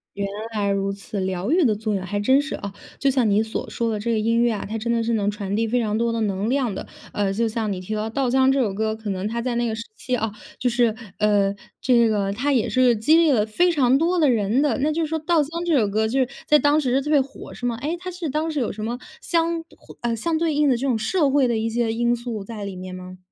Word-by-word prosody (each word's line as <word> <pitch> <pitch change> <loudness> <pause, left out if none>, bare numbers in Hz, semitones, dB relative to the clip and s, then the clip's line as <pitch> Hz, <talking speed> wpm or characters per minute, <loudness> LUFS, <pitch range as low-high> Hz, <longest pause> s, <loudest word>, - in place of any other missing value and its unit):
原 200 - -2 0.3
来 200 -1 +1
如 195 0 0
此， 200 +1 -6
疗 190 +5 -2
愈 350 +1 +4
的 225 -6 +3
作 215 0 -2
用， 190 -2 -2
还 205 +2 -2
真 260 +7 +4
是， 305 - -4
哦， 200 0 -6 0.2
就 275 - +2
像 255 -5 +2
你 205 +2 +3
所 220 0 -5
说 230 -1 -1
的 215 - -2
这 230 +3 -1
个 225 - +1
音 230 +2 +2
乐 240 -1 +3
啊， 205 - -3
它 220 - -5
真 230 +2 -2
的 230 -1 +1
是 230 - 0
能 205 -2 +1
传 205 -1 -3
递 225 +1 +1
非 245 +2 +1
常 215 -2 -1
多 235 +1 +1
的 230 - -2
能 200 0 -1
量 255 -5 0
的。 - - -6 0.3
呃， 200 -2 0
就 230 +3 0
像 220 -1 -2
你 185 - -3
提 185 +4 -5
到 215 +1 -2
《稻 270 +2 0
香》 265 +1 +4
这 275 - +1
首 210 -6 +1
歌， 220 +1 -1
可 220 -2 -5
能 190 +1 -2
它 235 +2 -3
在 245 0 -2
那 240 0 +1
个 220 - -2
时 220 - -5
期， 255 - -2
啊， 225 -2 -2 0.3
就 250 - 0
是， 235 -2 +2 0.2
呃， 205 -2 +3 0.3
这 235 -3 +4
个 200 -2 0
它 275 +7 0
也 245 -3 +2
是 255 +4 +1
一 - - +6
个 240 - +4
激 245 +10 +3
励 330 -2 +5
了 215 -5 +3
非 350 +12 +2
常 265 -5 +3
多 350 +3 +1
的 305 - +4
人 225 +2 +2
的， 275 -4 +1
那 300 +3 +1
就 325 +2 0
是 - - -1
说 320 +1 -2
《稻 345 +2 +1
香》 330 +4 -5
这 320 - +4
首 215 -5 +3
歌 215 +2 +1
就 255 +5 0
是 260 - +2 0.2
在 300 - +6
当 295 +1 +3
时 255 - -1
是 - - +4
特 300 - -3
别 290 -2 +5
火 270 +1 -9
是 245 - -4
吗？ 235 -1 -2
诶， 315 +4 -1
它 370 +1 -6
是 355 -2 -5
当 310 +3 -1
时 305 -3 -2
有 235 - -1
什 215 - -7
么 235 +2 -2 0.2
相 335 -1 0 0.2
胡 - - -15
呃， 235 -1 0
相 330 +9 -1
对 325 -2 +1
应 295 0 +3
的 260 - +4
这 270 +4 -2
种 245 - +2
社 290 - +1
会 270 -1 +3
的 235 - 0
一 225 - -1
些 225 0 0
因 240 +1 +1
素 235 -3 -5
在 210 -1 -7
里 195 - -6
面 185 0 -7
吗？ 185 0 -9
230 Hz, 320 characters per minute, -23 LUFS, 210-275 Hz, 0.3 s, 一